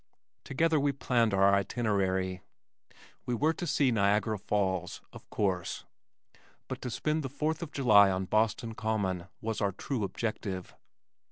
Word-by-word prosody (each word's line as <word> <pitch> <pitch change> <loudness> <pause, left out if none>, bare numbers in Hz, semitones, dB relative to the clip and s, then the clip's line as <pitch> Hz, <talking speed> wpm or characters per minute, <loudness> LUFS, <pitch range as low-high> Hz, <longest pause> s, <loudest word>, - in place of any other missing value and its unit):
Together 160 +3 +1
we 140 0 +2
planned 120 -4 +1
our 100 0 +4
itinerary. 95 -3 0 0.9
We 125 - 0
were 155 +6 +2
to 175 +1 -5
see 140 -3 +2
Niagara 105 0 +1
Falls, 95 -3 -1
of - - -13
course, 95 -4 -2 0.8
but - - -6
to 125 - -4
spend 155 +6 -1
the 135 - -4
fourth 155 +4 -2
of 165 -3 -5
July 105 -9 +6
on 95 0 -1
Boston 110 +3 0
Common, 100 -5 -2
was 110 0 -3
our 100 -1 +1
true 120 +4 -3
objective. 100 -2 -4
110 Hz, 145 wpm, -30 LUFS, 95-130 Hz, 0.9 s, July